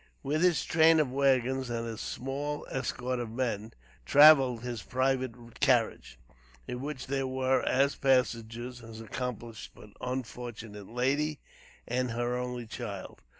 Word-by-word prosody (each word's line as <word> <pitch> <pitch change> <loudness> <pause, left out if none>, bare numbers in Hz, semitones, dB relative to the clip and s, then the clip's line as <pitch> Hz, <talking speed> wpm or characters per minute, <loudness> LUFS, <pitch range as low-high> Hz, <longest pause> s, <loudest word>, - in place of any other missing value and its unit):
With 150 +3 0
his 180 -3 +3
train 160 0 +5
of 145 -5 +1
wagons 130 -1 +2
and 115 -1 -2
his 115 -2 -5
small 145 +3 -4
escort 125 -1 -2
of 120 -2 -4
men, 115 -3 -2 0.3
traveled 135 - +7
his 120 -3 -4
private 130 -3 -2
carriage, - - +1 0.5
in 125 0 -4
which 145 -2 -5
there 135 0 -1
were, 130 0 +1
as 140 +2 +3
passengers, 120 -2 0
his 115 -2 -10
accomplished 115 -1 -6
but 105 - -14
unfortunate 120 -5 -6
lady 140 +5 0 0.5
and 125 +1 0
her 120 +1 -1
only 125 -1 -4
child. 105 -4 -7
125 Hz, 135 wpm, -30 LUFS, 115-135 Hz, 0.5 s, traveled